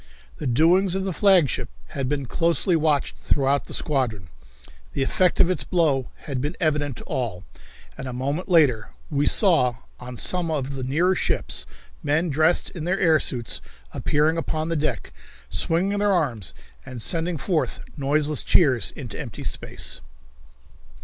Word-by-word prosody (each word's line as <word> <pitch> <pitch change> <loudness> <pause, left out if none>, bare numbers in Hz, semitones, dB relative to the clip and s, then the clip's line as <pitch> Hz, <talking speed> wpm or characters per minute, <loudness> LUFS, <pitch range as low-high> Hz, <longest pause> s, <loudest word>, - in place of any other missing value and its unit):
The - - -4
doings 175 +9 +3
of 190 - -1
the 190 -1 -2
flagship 185 - +3 0.2
had 135 -2 -3
been 140 -2 -1
closely 170 +6 +1
watched 155 -3 +1
throughout 140 0 +1
the - - -8
squadron. 120 - -2 0.6
The 135 - 0
effect 180 +6 +1
of 185 - +6
its 175 -8 0
blow 140 -4 +1 0.2
had 135 -4 -3
been 150 +5 -3
evident 145 -4 0
to - - -9
all, 110 -8 -3 0.5
and 135 - -7
a - - -4
moment 140 +9 -3
later 135 -11 +3 0.2
we 145 0 +1
saw, 155 - +5 0.2
on 125 -1 -8
some 180 +4 +1
of 140 -3 -2
the 130 - -4
nearer 165 +9 +2
ships, - - -1 0.3
men 160 +4 +1
dressed 155 +4 +2
in 160 -3 -6
their 185 +2 0
air 160 -2 +4
suits, 120 -5 -1 0.3
appearing 155 +3 +1
upon 160 0 -2
the 165 - -1
deck, 155 0 -2 0.4
swinging 195 +5 0
their 205 0 +2
arms 125 - -1 0.3
and 125 - -8
sending 165 +6 0
forth 160 +1 -1
noiseless 145 +1 +1
cheers 130 - +3
into - - -7
empty - - -7
space. - - -3
150 Hz, 155 wpm, -24 LUFS, 135-170 Hz, 0.6 s, of